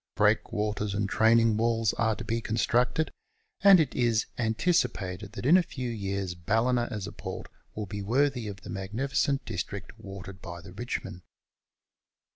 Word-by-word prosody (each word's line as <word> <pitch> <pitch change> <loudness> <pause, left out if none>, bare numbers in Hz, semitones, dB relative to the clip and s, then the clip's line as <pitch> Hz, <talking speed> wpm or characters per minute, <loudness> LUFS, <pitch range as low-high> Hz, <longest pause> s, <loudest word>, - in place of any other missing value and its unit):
Breakwaters 105 -1 +1
and 100 -1 0
training 115 +1 +4
walls 115 -1 +2
are 110 -1 +1
to - - -7
be 115 +1 -1
constructed, 120 +7 +1 0.5
and 195 -2 +9
it 150 -5 +1
is 115 -3 +2
anticipated 110 - 0
that 115 - -6
in 165 +7 +7
a - - +5
few 130 -7 -5
years 100 -4 -3
Ballina 115 +7 +1
as 105 -3 -4
a - - -6
port - - -7 0.3
will 105 - -3
be 100 +1 -5
worthy 125 +2 +1
of 100 -1 -7
the - - -8
magnificent 130 +8 -1
district 100 -1 -5
watered 95 -2 -9
by 85 -1 -7
the 90 +2 -12
Eichmoud. 105 -4 -5
110 Hz, 155 wpm, -28 LUFS, 100-120 Hz, 0.5 s, and